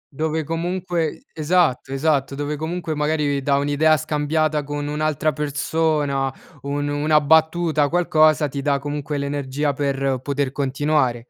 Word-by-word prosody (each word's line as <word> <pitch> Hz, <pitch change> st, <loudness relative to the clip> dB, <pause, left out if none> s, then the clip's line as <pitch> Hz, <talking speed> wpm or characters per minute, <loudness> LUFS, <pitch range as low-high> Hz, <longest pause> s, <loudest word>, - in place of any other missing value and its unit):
Dove 160 Hz, +2 st, -1 dB
comunque 170 Hz, 0 st, -2 dB
esatto, 155 Hz, -4 st, +1 dB
esatto 140 Hz, -1 st, 0 dB
dove 145 Hz, +1 st, -3 dB
comunque 160 Hz, +2 st, -3 dB
magari 150 Hz, -2 st, 0 dB
dà 140 Hz, +1 st, +1 dB
un'idea 145 Hz, +2 st, +3 dB
scambiata 150 Hz, +1 st, 0 dB
con 145 Hz, 0 st, -4 dB
un'altra 155 Hz, 0 st, 0 dB
persona, 145 Hz, -2 st, 0 dB, 0.3 s
un 145 Hz, +1 st, -2 dB
una 150 Hz, +1 st, +2 dB
battuta, 160 Hz, 0 st, +3 dB
qualcosa 155 Hz, -3 st, +3 dB
ti 140 Hz, 0 st, -5 dB
dà 140 Hz, 0 st, +1 dB
comunque 145 Hz, +1 st, -4 dB
l'energia 140 Hz, 0 st, -2 dB
per 135 Hz, -1 st, -1 dB
poter 140 Hz, -1 st, -1 dB
continuare. 135 Hz, -3 st, 0 dB
145 Hz, 130 wpm, -21 LUFS, 140-155 Hz, 0.3 s, un'idea